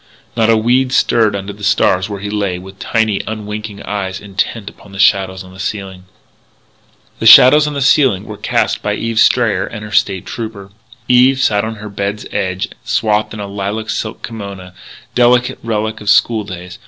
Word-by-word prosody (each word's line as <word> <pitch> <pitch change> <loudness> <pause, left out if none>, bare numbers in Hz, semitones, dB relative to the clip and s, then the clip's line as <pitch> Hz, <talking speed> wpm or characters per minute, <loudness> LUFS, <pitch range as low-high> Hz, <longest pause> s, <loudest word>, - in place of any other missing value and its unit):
Not 115 -1 +2
a 115 - +5
weed 125 +3 +2
stirred 110 -4 +2
under 100 +1 -5
the 105 +1 -14
stars 95 -2 +2
where 100 -2 -6
he 105 0 -5
lay 100 -4 -1
with 95 +2 -12
tiny, 110 -3 0
unwinking 105 -1 -6
eyes 95 -2 -4
intent 100 +1 -3
upon 100 -1 -12
the - - -9
shadows 95 -1 +2
on 95 0 -14
the 95 - -14
ceiling. 95 -2 -5 1.1
The - - +2
shadows 150 +4 +8
on 150 - -4
the 140 - 0
ceiling 130 -8 +3
were 105 - -8
cast - - -1
by - - -1
Eve 115 -1 -2
Strayer 110 -7 +3
and 105 -2 -8
her 105 - -10
State 95 -2 +1
Trooper. 105 -4 -7 0.4
Eve 130 +2 +4
sat 105 -6 +2
on 110 0 -4
her 110 0 -9
bed's 100 +1 -4
edge, 95 0 -2
swathed 110 0 0
in - - -8
a 100 - -4
lilac 100 +3 -4
silk 110 0 -5
kimona 100 -5 -8 0.4
delicate 125 +1 +2
relic 110 -1 -3
of 105 - -3
school 110 0 +3
days. 90 -2 -9
105 Hz, 185 wpm, -15 LUFS, 100-115 Hz, 1.1 s, shadows